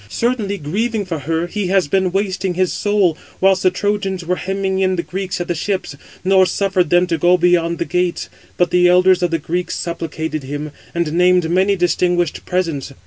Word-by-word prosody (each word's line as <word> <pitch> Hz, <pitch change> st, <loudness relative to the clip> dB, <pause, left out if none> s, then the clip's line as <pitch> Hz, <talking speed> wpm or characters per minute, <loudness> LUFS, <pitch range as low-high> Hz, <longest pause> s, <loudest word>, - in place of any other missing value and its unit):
Certainly, 220 Hz, -, -1 dB
grieving 205 Hz, +7 st, -2 dB
for 165 Hz, -4 st, -4 dB
her, 160 Hz, +4 st, -1 dB
he 195 Hz, +2 st, -3 dB
has 190 Hz, -3 st, +2 dB
been 185 Hz, +3 st, +1 dB
wasting 195 Hz, -1 st, -1 dB
his 185 Hz, 0 st, +1 dB
soul; 205 Hz, -5 st, +1 dB, 0.2 s
whilst 190 Hz, 0 st, +3 dB
the 185 Hz, -, +4 dB
Trojans 195 Hz, -1 st, -2 dB
were 180 Hz, +2 st, -1 dB
hemming 190 Hz, 0 st, -2 dB
in 185 Hz, -1 st, +2 dB
the 170 Hz, -, -2 dB
Greeks 190 Hz, 0 st, -4 dB
at 175 Hz, -, -3 dB
the 175 Hz, -, 0 dB
ships, 185 Hz, -2 st, -3 dB, 0.3 s
nor 190 Hz, 0 st, +4 dB
suffered 185 Hz, -2 st, 0 dB
them 175 Hz, +1 st, +4 dB
to 165 Hz, -3 st, -2 dB
go 175 Hz, +3 st, +4 dB
beyond 170 Hz, -1 st, +2 dB
the 170 Hz, -, -2 dB
gates: 180 Hz, 0 st, -1 dB, 0.3 s
but 175 Hz, -, +1 dB
the 180 Hz, 0 st, +4 dB
elders 180 Hz, 0 st, +4 dB
of 175 Hz, -, +1 dB
the 165 Hz, -, 0 dB
Greeks 175 Hz, +3 st, -3 dB
supplicated 160 Hz, -2 st, -4 dB
him, 145 Hz, +2 st, -5 dB, 0.2 s
and 170 Hz, -3 st, -1 dB
named 180 Hz, -1 st, +3 dB
many 190 Hz, +3 st, +3 dB
distinguished 175 Hz, -1 st, 0 dB
presents. 165 Hz, -7 st, -2 dB
180 Hz, 195 wpm, -18 LUFS, 170-190 Hz, 0.3 s, the